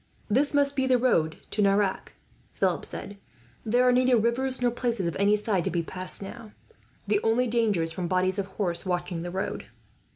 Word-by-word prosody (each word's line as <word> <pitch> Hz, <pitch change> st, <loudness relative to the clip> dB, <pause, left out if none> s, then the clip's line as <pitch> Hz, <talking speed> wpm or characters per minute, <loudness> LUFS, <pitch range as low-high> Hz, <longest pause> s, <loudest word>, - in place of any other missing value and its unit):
"This 275 Hz, +6 st, +3 dB
must 285 Hz, 0 st, +2 dB
be 265 Hz, -1 st, +1 dB
the 255 Hz, -1 st, +4 dB
road 165 Hz, -11 st, +1 dB
to 210 Hz, -, 0 dB
Nerac," 200 Hz, -1 st, +1 dB, 0.4 s
Philip -, -, 0 dB
said. 200 Hz, -, -7 dB, 0.5 s
"There 245 Hz, +3 st, +2 dB
are -, -, +6 dB
neither 250 Hz, 0 st, +4 dB
rivers 250 Hz, +4 st, 0 dB
nor 245 Hz, -1 st, +2 dB
places 235 Hz, -5 st, -2 dB
of 170 Hz, -, -2 dB
any 200 Hz, +1 st, +4 dB
size 210 Hz, -4 st, 0 dB
to -, -, +1 dB
be 170 Hz, 0 st, -1 dB
passed, 185 Hz, +3 st, -2 dB
now. 220 Hz, +2 st, -10 dB, 0.5 s
The 205 Hz, 0 st, +2 dB
only 230 Hz, +3 st, +2 dB
danger 225 Hz, -7 st, +1 dB
is 165 Hz, -, +1 dB
from 175 Hz, +1 st, -3 dB
bodies 185 Hz, +2 st, +1 dB
of 195 Hz, -, -2 dB
horse 185 Hz, -3 st, -3 dB
watching 175 Hz, -2 st, -2 dB
the 175 Hz, -, -5 dB
road." 190 Hz, +2 st, -4 dB
210 Hz, 195 wpm, -27 LUFS, 185-245 Hz, 0.5 s, are